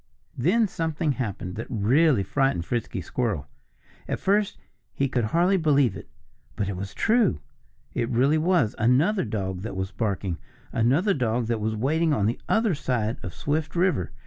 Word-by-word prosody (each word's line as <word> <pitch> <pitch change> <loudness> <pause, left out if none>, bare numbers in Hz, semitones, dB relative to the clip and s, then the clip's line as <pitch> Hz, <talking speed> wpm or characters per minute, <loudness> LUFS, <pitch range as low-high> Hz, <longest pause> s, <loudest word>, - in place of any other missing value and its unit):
Then 205 - +2
something 160 -3 -1
happened 105 -8 -4
that 115 - -5
really 125 +3 +3
frightened 135 -5 0
Frisky 115 -5 -2
Squirrel. 100 - -2 0.6
At - - -2
first 205 +1 +1 0.4
he 140 - +1
could 125 -3 0
hardly 175 - +3
believe 145 - +3
it. - - -10 0.5
But 100 - -1
it 100 - -3
was 100 +2 -6
true. 225 - +2 0.5
It 115 - -1
really 135 +6 +3
was 165 - +2
another 140 - +3
dog 95 -4 -3
that 105 -1 -5
was 95 0 -3
barking 95 -5 -2 0.3
another 135 - +2
dog 120 -4 0
that 115 -1 -1
was 110 +1 -1
waiting 155 +8 +1
on 105 -8 +1
the 115 +3 -1
other 220 -3 +3
side 120 -6 -1
of 90 - -7
Swift 155 +2 -2
River. 170 - +1
125 Hz, 165 wpm, -25 LUFS, 105-160 Hz, 0.6 s, really